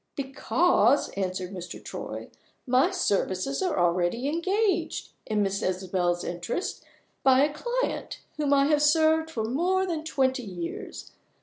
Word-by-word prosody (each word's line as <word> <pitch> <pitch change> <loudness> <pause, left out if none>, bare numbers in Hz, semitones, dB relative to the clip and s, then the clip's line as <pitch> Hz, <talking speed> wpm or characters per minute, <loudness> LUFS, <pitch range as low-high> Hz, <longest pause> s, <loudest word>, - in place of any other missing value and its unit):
"Because," 275 0 +2
answered 185 -1 -3
Mr. 180 -2 -7
Troy, - - -7 0.3
"my 255 +5 +4
services 270 - 0
are 365 - 0
already 175 +8 +1
engaged, 380 +7 0 0.2
in 210 -1 +1
Miss 195 0 -1
Isabel's 180 -1 0
interest, 175 - -4 0.4
by 265 0 +5
a 295 0 +1
client - - -3 0.2
whom 295 -2 0
I 280 -1 +5
have 295 0 +3
served 315 +1 +4
for 230 -9 -3
more 350 +11 +1
than 330 -4 -3
twenty 265 -4 +1
years. 180 -6 -7
270 Hz, 130 wpm, -27 LUFS, -, 0.4 s, by